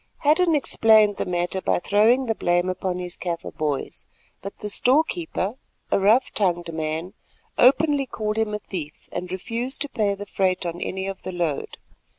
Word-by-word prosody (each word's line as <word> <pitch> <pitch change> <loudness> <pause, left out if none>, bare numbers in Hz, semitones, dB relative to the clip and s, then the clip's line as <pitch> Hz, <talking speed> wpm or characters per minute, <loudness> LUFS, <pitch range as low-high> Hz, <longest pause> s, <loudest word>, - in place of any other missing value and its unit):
Hadden 320 +3 +4
explained 220 -6 +4
the - - -2
matter 175 +1 -1
by - - +1
throwing 220 +8 +3
the 225 - +1
blame 175 -3 +1
upon 185 0 -2
his 180 -1 -5
Kaffir 170 -2 -5
"boys," 150 -3 -3 0.3
but 200 - -8
the 210 - -5
storekeeper, 260 - +1 0.3
a - - +3
rough 215 +7 +4
tongued 175 -4 0
man, 160 +3 -3 0.5
openly 280 +1 +4
called 215 -2 -2
him 215 -1 0
a - - -1
thief 170 -7 -7
and 180 0 -5
refused 235 +8 -3
to 290 - -1
pay 205 -5 0
the 205 +1 -7
freight 185 -2 0
on 170 0 -4
any 190 0 -3
of 195 0 -5
the 185 - -5
load. 170 -5 -2
200 Hz, 170 wpm, -24 LUFS, 175-230 Hz, 0.5 s, Hadden